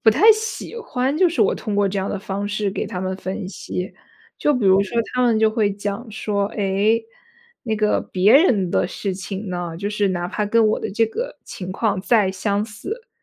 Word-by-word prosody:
不 230 Hz, -, +4 dB
太 430 Hz, -, +6 dB
喜 445 Hz, +2 st, -1 dB
欢 270 Hz, -, -1 dB
就 370 Hz, -2 st, +5 dB
是 335 Hz, -, +1 dB
我 -, -, +3 dB
通 210 Hz, -2 st, -4 dB
过 200 Hz, -1 st, +3 dB
这 195 Hz, +1 st, -2 dB
样 190 Hz, -, -2 dB
的 205 Hz, -, -2 dB
方 200 Hz, +1 st, -3 dB
式 210 Hz, -1 st, -1 dB
给 -, -, -3 dB
他 180 Hz, -, -5 dB
们 185 Hz, 0 st, -2 dB
分 190 Hz, 0 st, -5 dB
析。 180 Hz, -1 st, -5 dB, 0.5 s
就 295 Hz, -, +2 dB
比 245 Hz, -5 st, -1 dB
如 190 Hz, 0 st, +6 dB
说 200 Hz, +4 st, -3 dB, 0.2 s
他 250 Hz, 0 st, +1 dB
们 230 Hz, -3 st, +3 dB
就 220 Hz, -, +4 dB
会 215 Hz, -2 st, +1 dB
讲 205 Hz, +4 st, -4 dB
说， 205 Hz, -2 st, -1 dB
哎， 205 Hz, +3 st, +2 dB, 0.6 s
那 220 Hz, -2 st, 0 dB
个 210 Hz, 0 st, +2 dB
别 195 Hz, +4 st, +4 dB
人 230 Hz, -, +5 dB
的 -, -, +2 dB
事 195 Hz, +1 st, -3 dB
情 195 Hz, +2 st, -6 dB
呢， 175 Hz, -2 st, -4 dB
就 200 Hz, +4 st, -3 dB
是 205 Hz, -1 st, +1 dB
哪 175 Hz, -1 st, -2 dB
怕 210 Hz, +2 st, -2 dB
跟 230 Hz, +1 st, +3 dB
我 -, -, +1 dB
的 -, -, -4 dB
这 225 Hz, +2 st, +3 dB
个 475 Hz, -, -5 dB
情 185 Hz, -1 st, -7 dB
况 205 Hz, -2 st, 0 dB
再 205 Hz, -2 st, +3 dB
相 200 Hz, +2 st, -1 dB
似， 370 Hz, -, -7 dB
205 Hz, 235 characters per minute, -21 LUFS, 190-230 Hz, 0.6 s, 太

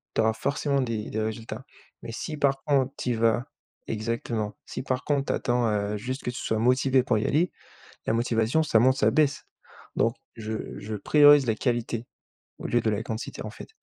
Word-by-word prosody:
tu -, -, +3 dB
auras 110 Hz, 0 st, +3 dB
forcément 140 Hz, +4 st, 0 dB
des 115 Hz, -4 st, -3 dB
des 110 Hz, -, -1 dB
résultats. 110 Hz, +2 st, -4 dB, 0.4 s
Mais -, -, -6 dB
si, 155 Hz, +6 st, -5 dB
par 135 Hz, -1 st, +1 dB
contre, 135 Hz, -2 st, +2 dB
tu 125 Hz, -, -1 dB
y -, -, +2 dB
vas 115 Hz, +2 st, +2 dB, 0.4 s
exactement, 110 Hz, -1 st, -2 dB
si, -, -, -5 dB
par 130 Hz, 0 st, -2 dB
contre, 140 Hz, -2 st, +1 dB
tu -, -, +1 dB
attends 105 Hz, -4 st, 0 dB
juste 130 Hz, +6 st, -5 dB
que 125 Hz, -, -2 dB
tu 125 Hz, -, -8 dB
sois 110 Hz, -, 0 dB
motivé 130 Hz, +2 st, +3 dB
pour 125 Hz, -3 st, +1 dB
y -, -, -2 dB
aller, 170 Hz, +5 st, +2 dB, 0.6 s
la -, -, +2 dB
motivation 115 Hz, +4 st, +2 dB
ça 150 Hz, -7 st, +2 dB
monte, 130 Hz, +3 st, +4 dB
ça 105 Hz, -, +4 dB
baisse. 145 Hz, +1 st, +2 dB, 0.5 s
Donc, -, -, +2 dB, 0.2 s
je 110 Hz, 0 st, -5 dB
je 110 Hz, +1 st, -5 dB
priorise 145 Hz, +4 st, +6 dB
la 110 Hz, -, +2 dB
qualité, 120 Hz, -1 st, -1 dB, 0.5 s
au -, -, -5 dB
lieu 120 Hz, -, +2 dB
de 115 Hz, -, +1 dB
la 105 Hz, +1 st, -1 dB
quantité, 110 Hz, -2 st, -5 dB
en -, -, -5 dB
fait. -, -, -11 dB
120 Hz, 200 wpm, -26 LUFS, 110-135 Hz, 0.6 s, priorise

